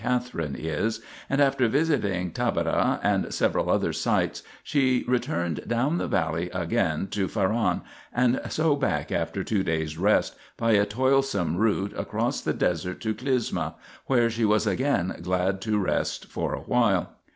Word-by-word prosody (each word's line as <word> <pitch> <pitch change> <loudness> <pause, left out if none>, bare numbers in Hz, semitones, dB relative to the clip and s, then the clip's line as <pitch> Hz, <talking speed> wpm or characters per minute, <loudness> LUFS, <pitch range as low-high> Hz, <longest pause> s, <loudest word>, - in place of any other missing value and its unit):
Catherine 125 - -1
is), 80 +9 -2 0.3
and 135 - +1
after 135 -3 +3
visiting 110 - +1
Taberah - - +1
and - - +1
several - - +1
other - - +1
sites - - 0 0.2
she 130 -3 +1
returned 85 - -1
down 130 +9 +1
the - - -2
valley 80 0 0
again 80 +3 0
to 100 -2 0
Faran, 110 +3 0 0.3
and 125 0 +2
so 155 -2 +2
back 90 - -1
after - - -1
two 105 -3 0
days' 80 -3 -2
rest, 100 +3 +2 0.2
by 115 - +1
a 100 -1 +4
toilsome 130 - +1
route 100 0 +1
across - - -2
the - - -1
desert 90 +1 -1
to 110 -1 -1
Clysma, 125 +1 -1 0.3
where 120 -3 +3
she 115 +1 -2
was 105 0 +3
again 130 -9 0
glad 90 +2 0
to 110 0 0
rest 100 - -1
for - - -3
a - - -7
while. 105 -7 +1
105 Hz, 150 wpm, -26 LUFS, 90-125 Hz, 0.3 s, a